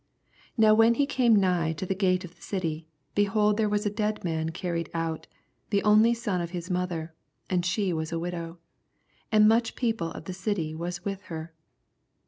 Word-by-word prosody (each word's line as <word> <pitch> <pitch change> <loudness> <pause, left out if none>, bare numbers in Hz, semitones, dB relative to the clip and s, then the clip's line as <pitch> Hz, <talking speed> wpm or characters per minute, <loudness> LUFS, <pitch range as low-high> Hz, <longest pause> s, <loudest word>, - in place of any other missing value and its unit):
12 - - -39
Now 220 -1 +6
when 225 +2 +5
he 285 - +2
came 250 -5 +3
nigh 180 -5 +2
to 160 +4 -5
the 190 - 0
Sate 185 -1 +1
of 175 - -12
the - - -28
city, 165 -5 -3 0.3
behold 210 +1 +2
there 215 -2 +2
was 210 +1 0
a 205 - 0
ead 210 0 -1
man 160 -2 -1
carried 170 -1 -3
out, 165 -1 -3 0.4
the 200 -1 +1
only 215 +3 +5
son 205 -6 -2
of 170 - -3
his 180 +1 -5
mother, 175 -3 -2 0.4
and 180 -1 +2
she 185 +1 0
was 160 0 -3
a 165 - -1
widow: 170 0 -5 0.7
and 215 -1 +6
much 230 +1 +2
people 225 -9 -1
of - - -9
the 185 - -5
city 180 -5 -2
was 175 +2 -5
with 195 -1 -3
her. 160 0 -6
185 Hz, 195 wpm, -27 LUFS, 165-210 Hz, 0.7 s, Now